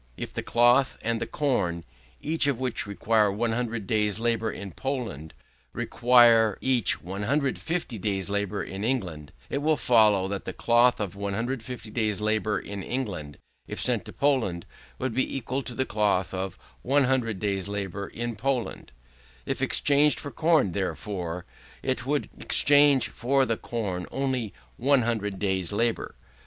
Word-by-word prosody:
"If - - -6
the - - -3
cloth 120 +3 +3
and 115 0 -1
the - - -2
corn, 100 - -1 0.4
each 160 -2 +2
of 135 -4 0
which 130 -5 -2
required 105 0 +2
100 115 0 -2
days' 105 0 +1
labour 115 -1 0
in 100 -1 -7
Poland, 110 - -4 0.4
required 115 -3 +4
each 125 - +2
150 130 - -2
days' 95 -1 -2
labour 100 0 -2
in 95 +1 -6
England; 90 - -2 0.2
it 140 - -1
would 155 +1 +2
follow, 105 -5 +4
that 100 0 -4
the - - -4
cloth 120 +1 +3
of 100 -3 -3
150 115 +4 -4
days' 110 -4 0
labour 110 -1 0
in 100 +1 -6
England, 95 - -4 0.3
if - - -6
sent - - +1
to - - -9
Poland, 125 -12 0 0.3
would 130 -2 -2
be 130 +2 0
equal 130 +2 -3
to 120 -1 -8
the 130 - 0
cloth 100 -5 +1
of 95 0 -4 0.2
100 130 -5 +1
days' 100 -2 -1
labour 100 -1 -4
in 120 0 -4
Poland: 130 +2 -2 0.5
if - - -3
exchanged 145 +1 +4
for 145 - -7
corn, 155 - +2
therefore, 90 -2 -4 0.4
it 130 -1 -2
would 145 +1 0
exchange 145 -2 +5
for 135 +3 +1
the 115 - 0
corn 100 -7 -4
of - - -16
only 130 -6 -1 0.3
100 115 -7 +1
days' 95 -2 -1
labour. 115 +2 -1
115 Hz, 150 wpm, -26 LUFS, 100-130 Hz, 0.5 s, exchange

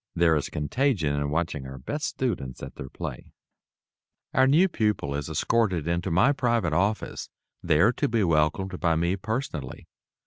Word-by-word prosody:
There 85 -2 +4
is 75 - -1
contagion 80 - 0
in 70 0 -1
watching 75 -3 -2
our 65 0 -8
best 145 - -4
students 90 - -3
at - - -7
their 65 - -8
"play." - - -7 1.0
Our 130 +1 +5
new 160 +8 +5
pupil 105 - -1
is 70 -1 -3
escorted 105 -9 +1
also 85 - -1
into 85 +2 -2
my 95 +11 +4
private 120 - +1
office, 100 +6 -1 0.3
there 85 +7 +4
to - - 0
be 115 -2 +1
welcomed 80 +3 +1
by 85 -2 +2
me 85 +3 +1
personally. 100 - -4
85 Hz, 165 wpm, -26 LUFS, 75-115 Hz, 1.0 s, Our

